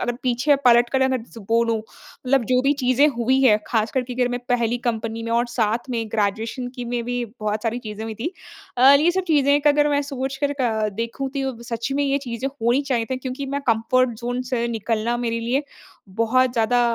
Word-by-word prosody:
अगर 240 - 0
पीछे 255 +3 +2
पलट 240 0 +6
कर 265 -1 +2
अगर 260 -2 +1 0.3
बोलूँ 230 0 +2
मतलब 250 +3 -3
जो 250 +3 +2
भी 275 +2 +3
चीज़ें 265 0 +3
हुई 255 +3 +2
हैं, 215 -5 +5
खासकर 225 +3 0
की 250 0 -7
अगर 250 -1 +1
मैं 245 0 -3
पहली 240 -1 +1
कंपनी 225 0 -3
में 230 - -4
और 235 +1 +2
साथ 235 +1 -1
में 235 -2 -1
ग्रेजुएशन 225 +4 -1
की 245 - -4
में 240 0 -2
भी 245 0 -2 0.2
बहुत 215 0 -2
सारी 235 +1 -1
चीज़ें 215 -2 -7
हुई 225 0 -5
थीं। 230 +9 -3 0.5
अ, 260 +3 +7
ये 305 +5 +4
सब 375 +1 -1
चीज़ें 285 -1 +4
अगर 295 0 +4
मैं 290 0 +1
सोच 270 -1 -4
कर 285 - +1
अ, 225 -6 0
देखूँ 230 +6 -4
तो 275 - -5
ये 270 -1 -1
सच 235 +3 -3
में 285 - +1
ये 280 0 +1
चीज़ें 240 +2 -3
होनी 265 0 0
चाहिए 235 -3 +1
थी 260 - 0
क्योंकि 260 +2 -5
मैं - - -1
कम्फर्ट 230 +1 +2
ज़ोन 245 +1 -2
से 235 -1 +1
निकलना 225 +1 -1
मेरे 230 -1 -2
लिए, 245 +5 0 0.5
बहुत 230 +5 +1
ज़्यादा 235 +1 +2
245 Hz, 210 wpm, -22 LUFS, 230-265 Hz, 0.5 s, अ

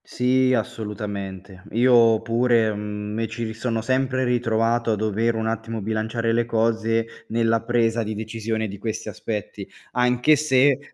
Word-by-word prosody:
Sì, 130 +1 +2
assolutamente. 100 -4 -5
Io 115 -2 +5
pure, 115 -1 +2
mhmm, 105 0 -5
mi 115 +1 -1
ci 115 +2 -5
ri 110 -1 -3
sono 115 0 -2
sempre 130 +1 0
ritrovato 115 -1 +1
a - - +2
dover 110 +2 0
un 110 0 -2
attimo 115 0 -3
bilanciare 110 +2 -1
le 120 0 +2
cose 115 0 +1 0.2
nella 115 0 +1
presa 115 -1 +1
di 110 0 -3
decisione 110 0 -3
di 100 -1 -8
questi 110 +1 -4
aspetti, 105 -3 -5 0.2
anche 125 +4 +3
se 140 -2 +3
115 Hz, 150 wpm, -23 LUFS, 110-120 Hz, 0.2 s, Io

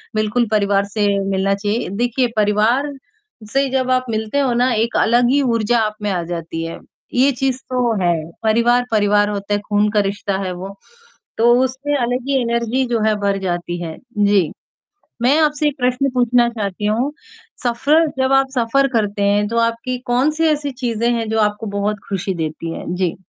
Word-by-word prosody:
बिल्कुल 215 +3 +1
परिवार 200 -2 +2
से 210 -2 +2 0.2
मिलना 195 0 +1
चाहिए। 205 +1 -2
देखिए, 245 +1 +1
परिवार 215 +7 +2 0.6
से 275 0 +2
जब 260 -1 0
आप 255 0 +2
मिलते 220 +5 -1
हो 260 -3 +1
ना, 250 +2 +2
एक 230 +1 0
अलग 240 +2 +3
ही 285 +1 +3
ऊर्जा 235 -2 +1
आप 215 -1 -1
में 210 - 0
आ 180 -2 -1
जाती 165 -1 -5
है, 165 - -7 0.3
ये 260 +3 +4
चीज़ 265 0 -1
तो 250 -2 +1
है। 175 - +3 0.3
परिवार, 235 +3 +3
परिवार 205 -1 +3
होता 205 0 -3
है, 205 - +1
खून 205 0 +2
का 210 - +2
रिश्ता 200 -1 -3
है 185 - -2
वो। 190 +2 -8 0.6
तो 235 +1 +5
उसमें 265 +3 -2
अलग 245 0 -1
ही 270 -2 +2
एनर्जी, 235 +2 0
जो 235 -2 0
है, 215 - +2
भर 200 -1 +1
जाती 175 0 -3
है, 160 -1 -6 0.2
जी। 200 -5 +3 0.7
मैं 270 +5 +4
आपसे 300 0 +1
ये 295 - +3
प्रश्न 250 +2 +1
पूछना 245 -1 +3
चाहती 210 -3 -4
हूँ, 230 +7 0 0.5
सफर 285 +7 +2
जब 260 0 +1
आप 270 0 +3
सफर 255 +3 +2
करते 205 -3 0
हैं, 205 +1 +2
तो 230 +2 -3
आपकी 230 +2 -1
कौन-सी 285 +6 +1
ऐसी 295 -2 0
चीज़ें 240 -3 -1
हैं, 230 -1 -2
जो 220 0 0
आपको 210 +1 0
बहुत 205 +1 -1
खुशी 195 0 -2
देती 160 0 -4
हैं? 175 - -5
जी। 180 -2 -1
230 Hz, 185 wpm, -19 LUFS, 205-255 Hz, 0.7 s, तो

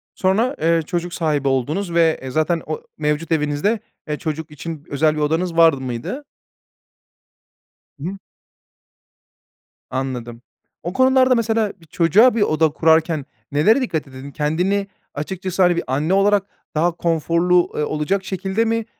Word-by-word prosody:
Sonra, 220 +9 +1
eee, 165 0 +3
çocuk 175 +1 -3
sahibi 150 -5 0
oldunuz 150 +8 -1
ve, 165 -1 +3
eee, 130 0 -6
zaten 155 +3 +1
o 155 - -4 0.2
mevcut 150 +2 -1
evinizde, 150 +8 +1 0.3
eee, 150 - -1
çocuk 155 0 -5
için 155 0 -7
özel 155 +2 +2
bir 150 - -2
odanız 165 +3 0
var 165 -2 +7
mıydı? 130 - -5 1.7
Hı - - -9
hı. 195 - -7 1.7
Anladım, 125 -3 -4 0.4
o 175 +2 -4
konularda, 260 +2 +4
mesela, 225 -2 0
bir - - -17
çocuğa 190 +10 +4
bir 230 - 0
oda 160 -4 +3
kurarken 160 -1 +2 0.3
nelere 165 - +4
dikkat 160 - -2
edin? 135 +1 -10
Kendini 180 +8 0 0.3
açıkçası, 185 +4 -3
hani, 175 -1 +4
bir 170 - -1
anne 145 +7 0
olarak 200 0 +3 0.3
daha 170 +3 +2
konforlu, 170 +1 +1
eee, 150 - 0
olacak 155 +7 -1
şekilde 190 +4 -1
mi, 230 0 0
165 Hz, 140 wpm, -20 LUFS, 150-190 Hz, 1.7 s, var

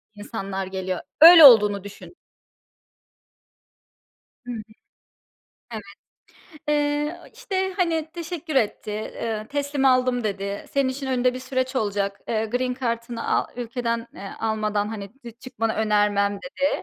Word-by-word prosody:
insanlar 200 -2 -5
geliyor. 190 -1 -4 0.2
Öyle 330 0 +11
olduğunu 210 -7 +7
düşün. 205 - -12 2.3
Hı 245 - -6
hı. 230 -2 -5 1.1
Evet. 205 -2 -9 0.7
Eee, 295 +2 0
işte, 380 -1 -3
hani, 325 -4 0
teşekkür 335 -3 -5
etti, 215 -2 -1
ııı, 220 -2 -3
teslim 285 -1 -2
aldım 255 -2 +3
dedi. 200 -1 -3
Senin 275 -1 +1
için 270 +1 -5
önünde 250 -1 +1
bir - - -5
süreç 260 0 -2
olacak. 200 -3 -1
Eee, 220 -1 0
green 250 +3 -1
kartını 235 -2 -4
a - - 0
ülkeden, 235 -1 -3
eee, 195 0 -8
almadan, 215 -2 -1
hani 205 -3 -7
d 235 - -7
çıkmanı 225 -2 -3
önermem 205 -2 +1
dedi. 275 +1 -2
235 Hz, 125 wpm, -23 LUFS, 210-275 Hz, 2.3 s, Öyle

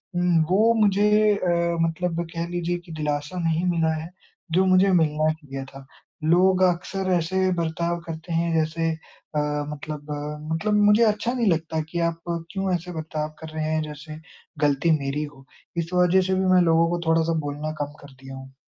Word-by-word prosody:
उम, 175 -2 +3
वो 215 +5 +4
मुझे 210 +1 +4
अ, 170 -3 0
मतलब 165 +1 -1
कह 170 0 -3
लीजिए 175 0 -2
कि 170 - -11
दिलासा 150 +2 -3
नहीं 165 +2 0
मिला 165 -2 +1
है 165 - -8 0.4
जो 185 +3 +3
मुझे 185 +1 +4
मिलना 155 -3 +2
चाहिए 140 -4 -8
था। 135 0 -11 0.4
लोग 185 +4 +4
अक्सर 185 +2 0
ऐसे 175 +1 0 0.2
बर्ताव 170 +1 -1
करते 165 +1 -6
हैं 165 0 +1
जैसे 165 +1 0
अ, 160 -1 -7 0.3
मतलब 150 0 -7
अ, 150 +1 -4
मतलब 210 +6 0
मुझे 210 +2 +5
अच्छा 215 +2 +1
नहीं 240 -3 0
लगता 160 -1 -1
कि 170 - -3
आप 165 0 -8 0.3
क्यों 190 -1 -1
ऐसे 175 0 -3
बर्ताव 155 -1 -4
कर 160 - -8
रहे 155 0 -1
हैं 155 - +1
जैसे 155 +1 -8 0.4
गलती 145 +3 +2
मेरी 140 +2 -2
हो? 145 -2 -11 0.3
इस 165 -1 -1
वज़ह 180 +1 +4
से 190 - +1
भी 190 0 0
मैं 180 - +6
लोगों 165 -1 +4
को 175 0 -1
थोड़ा-सा 165 0 +2
बोलना 145 +2 -4
कम 145 0 -8
कर 140 - -14
दिया 135 0 -8
हूँ। 135 0 -11
165 Hz, 185 wpm, -24 LUFS, 155-180 Hz, 0.4 s, मैं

